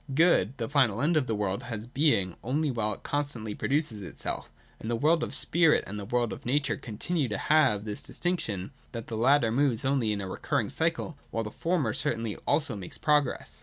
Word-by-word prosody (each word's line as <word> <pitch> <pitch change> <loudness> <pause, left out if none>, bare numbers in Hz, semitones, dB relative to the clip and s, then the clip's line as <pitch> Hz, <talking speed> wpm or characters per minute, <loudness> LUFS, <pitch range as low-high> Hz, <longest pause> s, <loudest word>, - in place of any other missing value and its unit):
Good, 140 - +4
the - - -2
final 130 -7 +2
end 160 +6 +2
of 145 -5 +2
the 110 - 0
world, 100 -2 -1
has 115 -2 -5
being, 125 - +2
only 145 +4 0
while 110 -3 -1
it - - -19
constantly 140 -7 -1
produces 140 -4 0
itself. 90 - -5 0.3
And 110 - -5
the 120 - +1
world 155 +7 +3
of - - -2
spirit 165 -2 +3
and 105 +1 -5
the 100 - -6
world 120 +1 0
of - - -9
nature 145 +3 +1
continue 140 +5 -2
to 105 -3 -2
have 130 -9 +3
this 105 -1 -4
distinction, 115 - -2 0.2
that 115 -2 -6
the 115 - -3
latter 120 +1 +4
moves 130 -1 +1
only 130 -5 +2
in 105 - -1
a 95 - -4
recurring 95 - -1
cycle, - - -1
while 115 - -2
the 105 - -6
former 165 -10 0
certainly 115 0 -1
also 145 -5 +1
makes 95 -3 -7
progress. 145 - +1
120 Hz, 205 wpm, -28 LUFS, 105-145 Hz, 0.3 s, Good